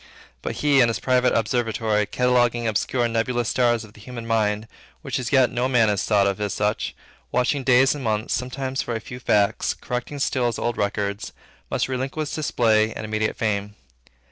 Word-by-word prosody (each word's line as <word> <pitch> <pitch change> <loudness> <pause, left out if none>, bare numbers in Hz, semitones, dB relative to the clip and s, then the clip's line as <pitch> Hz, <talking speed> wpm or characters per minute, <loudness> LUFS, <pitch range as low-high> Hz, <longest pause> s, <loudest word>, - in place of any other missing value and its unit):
But - - -4
he, 140 -2 +5
in 120 - +5
his 115 - -1
private 125 -1 +2
observatory, 110 -2 0
cataloguing 120 0 +2
obscure 110 +4 0
and 115 - -2
nebulous 120 0 0
stars 120 -2 +2
of 105 -1 -14
the - - -16
human 120 0 -8
mind, 110 -1 0 0.4
which - - -2
as 125 - -4
yet 130 -3 +4
no 125 +1 0
man 115 -4 +4
has 100 -2 0
thought 105 -2 +3
of 100 +1 -1
as 105 -1 -1
such, 105 0 -1 0.4
watching 130 +2 +1
days 130 +1 +5
and 145 -2 -6
months, 110 -1 -1
sometimes, 130 +1 -2
for 120 - -3
a - - -2
few 125 +3 -9
facts; 105 -4 +1
correcting 125 +4 -5
still 130 -2 +1
his 120 - -2
old 120 -1 -1
records; 100 0 -2 0.4
must - - 0
relinquish 135 +4 -3
display 110 -7 +2
and - - -5
immediate 110 0 -1
fame. 105 -2 -1
120 Hz, 190 wpm, -23 LUFS, 110-125 Hz, 0.4 s, he